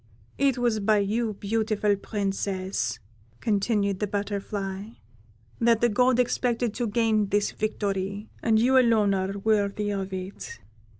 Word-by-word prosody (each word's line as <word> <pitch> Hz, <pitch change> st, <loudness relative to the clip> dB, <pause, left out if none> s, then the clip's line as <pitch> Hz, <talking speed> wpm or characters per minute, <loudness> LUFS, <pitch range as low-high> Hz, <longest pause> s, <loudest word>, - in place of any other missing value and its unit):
It 275 Hz, -2 st, +3 dB
was 240 Hz, -3 st, +1 dB
by 210 Hz, +1 st, +3 dB
you, 215 Hz, +2 st, 0 dB
beautiful 210 Hz, 0 st, 0 dB
Princess," 195 Hz, -, -2 dB, 0.4 s
continued 200 Hz, -2 st, 0 dB
the 210 Hz, -, -1 dB
Butterfly, 200 Hz, 0 st, -4 dB, 0.7 s
"that 230 Hz, -1 st, +4 dB
the 240 Hz, -, +3 dB
God 250 Hz, +3 st, +3 dB
expected 240 Hz, -2 st, 0 dB
to 240 Hz, 0 st, -2 dB
gain 215 Hz, -1 st, +2 dB
this 205 Hz, +1 st, +1 dB
victory, 200 Hz, -1 st, -3 dB
and 225 Hz, -1 st, +3 dB
you 255 Hz, +4 st, +5 dB
alone 220 Hz, -5 st, +3 dB
are 190 Hz, +1 st, -2 dB
worthy 205 Hz, 0 st, 0 dB
of 195 Hz, -1 st, -3 dB
it. 190 Hz, +1 st, -7 dB
210 Hz, 130 wpm, -26 LUFS, 200-225 Hz, 0.7 s, you